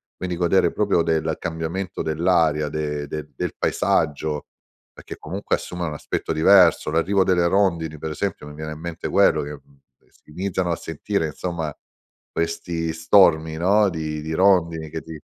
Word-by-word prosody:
quindi 90 -1 -4
godere 90 +2 +3
proprio 100 -5 +1
del 80 -1 0
cambiamento 85 +3 -4
dell'aria 80 -2 +2
de 75 -1 -3
de 75 0 -6
del - - -3
paesaggio, 75 0 0 0.5
perché - - -10
comunque 95 +6 -2
assume 90 -1 -5
un 80 - -3
aspetto 75 - -3
diverso, 85 -1 +5
l'arrivo 95 +5 +2
delle 90 -2 +2
rondini 85 -5 +1
per 80 - -4
esempio 95 -1 -4
mi 75 - -10
viene 75 0 -6
in 75 - -11
mente 85 0 -5
quello - - +4
che, 75 +1 -6
mhmm, 70 0 -16 0.2
ehm, - - -32
si - - -27
iniziano 95 +1 -2
a - - +1
sentire 80 +2 -2
insomma 80 -1 -4 0.6
questi 80 0 -2
stormi, 80 -2 +4
no, 100 +4 +3
di 80 -3 -4
di 80 +1 -4
rondini 85 -4 +2
che 80 +1 -5
ti 80 -1 -9
80 Hz, 165 wpm, -22 LUFS, 75-90 Hz, 0.6 s, diverso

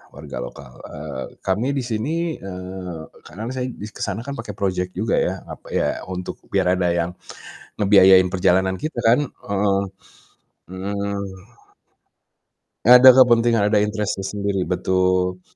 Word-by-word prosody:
warga - - -8
lokal, 65 +1 -10
eee, 65 - -7 0.2
kami 100 +7 0
di 135 - 0
sini 155 +9 -2
eee, 90 -3 -7 0.2
kadang 110 +8 -7
saya 125 -1 -2
di 105 - -9
ke - - -12
sana 100 +2 -4
kan 140 - -5
pakai 105 -3 -6
project 90 -2 -1
juga 105 +2 -1
ya, - - +1 0.2
apa - - -10
ya - - +1 0.2
untuk 90 0 -5 0.2
biar 90 -2 +2
ada 90 -1 +1
yang 85 0 -1 0.7
ngebiayain 95 -2 +6
perjalanan 95 +1 +2
kita 155 -1 -5
kan, 120 +4 +5
heeh. 100 -5 -1 0.9
Mhm. 100 +1 -3 1.6
Ada 125 +2 +10
kepentingan 120 -3 +5
ada 105 0 +3
interest-nya 105 -2 -2
sendiri, 100 -1 -2
betul. 90 0 0
100 Hz, 135 wpm, -21 LUFS, 90-110 Hz, 1.6 s, Ada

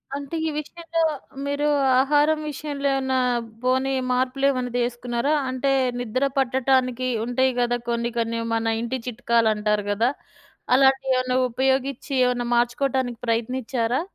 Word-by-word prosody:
అంటే 285 +3 -5
ఈ - - 0
విషయంలో 330 +2 -3 0.4
మీరు 285 +1 0 0.3
ఆహారం 295 +3 +3
విషయంలో 285 -1 -3
ఏమన్నా 265 -1 0 0.4
పోనీ 260 +1 +1 0.2
మార్పులేమన్నా 255 0 0
తీసుకున్నారా? 240 +3 -1 0.2
అంటే 260 +2 0 0.3
నిద్ర 245 +3 -1
పట్టటానికి 255 -1 +1 0.2
ఉంటాయి 260 +2 +2
కదా 245 0 +1
కొన్ని 235 0 0
కొన్ని 230 0 -1
మన 225 0 0
ఇంటి 250 +2 -3
చిట్కాలు 235 -1 +1
అంటారు 210 -1 0
కదా. 225 +4 +2 0.7
అలాంటియెమన్నా 265 -1 +3
ఉపయోగిచ్చి 265 +2 -1
ఏమన్నా 245 -1 0
మార్చుకోవటానికి 245 0 0
ప్రయత్నిచ్చారా? 235 +2 -1
255 Hz, 115 wpm, -23 LUFS, 240-270 Hz, 0.7 s, ఆహారం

